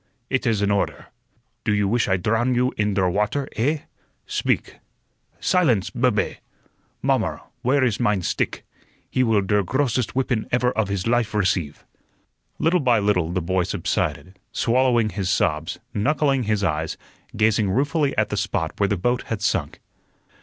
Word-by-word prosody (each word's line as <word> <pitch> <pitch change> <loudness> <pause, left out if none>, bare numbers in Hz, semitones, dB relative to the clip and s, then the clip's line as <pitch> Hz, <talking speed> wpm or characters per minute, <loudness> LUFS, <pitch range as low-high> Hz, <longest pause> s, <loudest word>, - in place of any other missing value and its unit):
It 130 -1 0
is 110 -3 +1
an 100 - +2
order. 100 -1 -1 0.5
Do - - 0
you 105 -1 +2
wish 120 +3 +1
I 95 -1 +2
drow 110 +6 +1
you 125 0 +1
in 105 -1 0
der 95 -2 +2
water, 105 +9 0
eh? 140 +7 0 0.4
Speak. - - -1 0.6
Silence, 135 - +2
bube! - - 0 0.7
Mommer, - - 0 0.2
where 130 +2 +2
ist 115 -5 +1
mein 105 -6 +1
stick? - - -2 0.5
He 130 - +1
will 110 -5 +3
der 105 +1 +2
grossest 125 +3 0
whippun 125 -4 0
ever 125 0 +2
of 110 -4 0
his 100 -2 -2
life 115 -2 +1
receive." 90 -7 0 0.7
Little 175 +3 +2
by 125 -5 +3
little 100 -5 +1
the 90 -1 -1
boy 95 +2 +1
subsided, 95 +2 -2
swallowing 120 -2 +2
his 95 -2 -3
sobs, 80 -4 0 0.2
knuckling 135 +2 +1
his 105 -1 0
eyes, 80 -3 -1 0.4
gazing 110 -2 +3
ruefully 140 - +1
at - - +2
the - - -2
spot - - -1
where 100 - +2
the 100 - 0
boat 120 +7 0
had 110 - -2
sunk. - - -1
110 Hz, 160 wpm, -23 LUFS, 100-125 Hz, 0.7 s, will